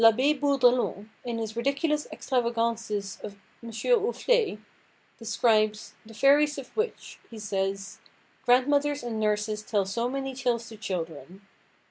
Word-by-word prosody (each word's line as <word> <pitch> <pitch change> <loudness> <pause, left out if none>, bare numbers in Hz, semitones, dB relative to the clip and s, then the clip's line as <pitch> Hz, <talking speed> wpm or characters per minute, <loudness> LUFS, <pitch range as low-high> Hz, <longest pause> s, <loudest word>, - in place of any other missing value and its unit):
L'Abbé 255 +6 +6
Bourdelon, 255 -7 +2
in 235 -2 -3
his 220 -1 -4
Ridiculous 280 +5 0
Extravagances 230 -5 -1
of 205 -1 -7 0.3
M. 235 - -8
Ouflé, 460 - +1 0.6
describes 215 -2 +1
"The 225 - -12
fairies 290 +5 +4
of 270 -3 -9
which," 445 +2 -3
he 230 - -10
says, 195 -2 -3 0.4
"grandmothers 285 +3 +3
and 230 -2 -3
nurses 210 0 0
tell 210 -2 0
so 230 +5 -1
many 270 0 -3
tales 245 -3 -1
to 220 - -10
children. 175 -2 -5
235 Hz, 125 wpm, -27 LUFS, 210-275 Hz, 0.6 s, L'Abbé